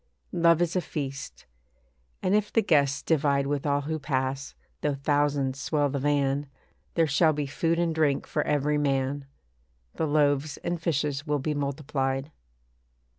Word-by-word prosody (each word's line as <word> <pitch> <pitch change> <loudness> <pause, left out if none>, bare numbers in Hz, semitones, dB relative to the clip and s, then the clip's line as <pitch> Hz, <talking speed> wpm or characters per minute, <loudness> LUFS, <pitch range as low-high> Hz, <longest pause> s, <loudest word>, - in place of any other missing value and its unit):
Love 170 -1 +4
is 175 +1 -2
a 185 - +2
feast; 140 -5 -6 0.8
and 185 - +2
if 210 0 +2
the 225 - +3
guests 140 -6 +2
divide 140 -3 +2
With 145 +1 -1
all 145 0 +2
who 155 +2 -3
pass, 135 -1 -2 0.3
though 145 -1 0
thousands 140 -1 0
swell 145 -2 +1
the 140 +1 -2
van, 145 0 +1 0.5
There 165 - +4
shall 155 +2 +3
be 145 -1 -2
food 165 +4 0
and 170 -1 +1
drink 150 -3 +1
for - - -1
every 150 0 +1
man; 135 0 0 0.7
The 160 - -1
loaves 145 0 +2
and 170 -1 -2
fishes 150 -2 -1
will 150 0 +1
be 150 +2 -2
multiplied. 140 -1 -2
145 Hz, 155 wpm, -27 LUFS, 140-155 Hz, 0.8 s, Love